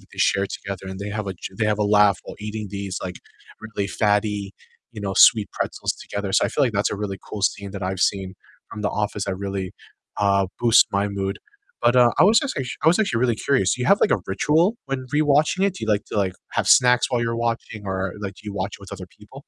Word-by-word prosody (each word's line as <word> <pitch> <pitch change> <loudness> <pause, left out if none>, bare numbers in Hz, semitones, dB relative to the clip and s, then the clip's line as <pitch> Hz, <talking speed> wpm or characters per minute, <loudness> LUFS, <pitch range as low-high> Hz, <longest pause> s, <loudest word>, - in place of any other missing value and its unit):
that - - -22
they - - -14
share 100 0 +2
together, 100 -1 -7
and 95 - -7
they 100 +1 -5
have 105 0 -4
a 95 - -4
j 95 +2 -9
they 110 - +1
have 105 0 0
a - - +1
laugh 105 -1 +4
while - - -8
eating 105 0 -5
these, 100 -2 -4
like, 90 -1 -5 0.4
really 110 -2 -4
fatty, 105 -1 0 0.4
you 110 - -8
know, 100 -1 -3
sweet 105 -2 +6
pretzels - - -2
together, 100 -1 -5
so - - +4
I - - +1
feel - - +1
like 120 - -1
that's 100 0 0
a - - -3
really 100 -1 -4
cool 105 - -6
scene 100 -1 -1
that 100 -1 -6
I've 95 0 -3
seen 95 -2 0 0.4
from 105 - -7
"The 105 - +1
Office" 105 -1 -2
that 95 -1 -2
really, 95 -1 -4 0.4
uh, 100 -1 +2
boosts 120 -2 +6
my 100 +1 +1
mood, 100 -1 -3 0.4
but, 120 +1 +4
uh, 120 -1 +6
I 160 - +7
was 215 +3 +6
just 275 - -3
act 135 - -3 0.2
I - - +7
was 170 - +4
actually 160 - +1
really 120 -2 +2
curious, 115 -6 +1
do 125 - -5
you - - -1
have, 200 - +5
like, - - +3
a - - +2
ritual 160 - +2
when 130 -1 -4
rewatching 150 +5 +3
it? 195 - -2
Do 150 - -5
you - - -7
like 105 -1 +1
to - - -6
like, 95 -2 +1 0.2
have - - 0
snacks 125 -1 +5
while 120 - +1
you're 115 0 -1
watching 115 -2 -3
or, 95 -1 -2
like, 100 -2 -5
do - - -16
you 105 - -5
watch 100 +1 -3
it - - -31
with 100 - -12
other 95 -2 -7
people? 105 +6 -14
105 Hz, 260 wpm, -23 LUFS, 100-120 Hz, 0.4 s, I